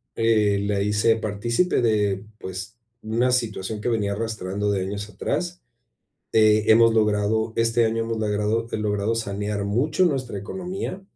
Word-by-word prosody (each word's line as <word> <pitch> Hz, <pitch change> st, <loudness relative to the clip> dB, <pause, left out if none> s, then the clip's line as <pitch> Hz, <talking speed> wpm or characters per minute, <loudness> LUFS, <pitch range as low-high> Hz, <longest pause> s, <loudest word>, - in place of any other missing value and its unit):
eh, 110 Hz, -3 st, +2 dB
la 100 Hz, -1 st, 0 dB
hice 105 Hz, +2 st, +2 dB
partícipe 115 Hz, -, 0 dB
de, 105 Hz, -3 st, +1 dB
pues 95 Hz, +5 st, -7 dB, 0.2 s
una 115 Hz, +3 st, +1 dB
situación 110 Hz, -3 st, -2 dB
que -, -, -1 dB
venía 105 Hz, -3 st, 0 dB
arrastrando 105 Hz, -2 st, -2 dB
de 95 Hz, -2 st, 0 dB
años 100 Hz, +2 st, -4 dB
atrás, 175 Hz, -, -3 dB, 0.7 s
eh, 110 Hz, -1 st, +4 dB
hemos 115 Hz, +1 st, +6 dB
logrado, 110 Hz, +1 st, +1 dB
este 115 Hz, 0 st, +3 dB
año 115 Hz, 0 st, 0 dB
hemos 115 Hz, -1 st, -3 dB
logrado 105 Hz, +2 st, 0 dB
he -, -, -1 dB
logrado 105 Hz, +1 st, -1 dB
sanear 105 Hz, -1 st, -2 dB
mucho 135 Hz, -, +1 dB
nuestra 130 Hz, -, -1 dB
economía, 185 Hz, -, -5 dB
110 Hz, 145 wpm, -24 LUFS, 105-115 Hz, 0.7 s, hemos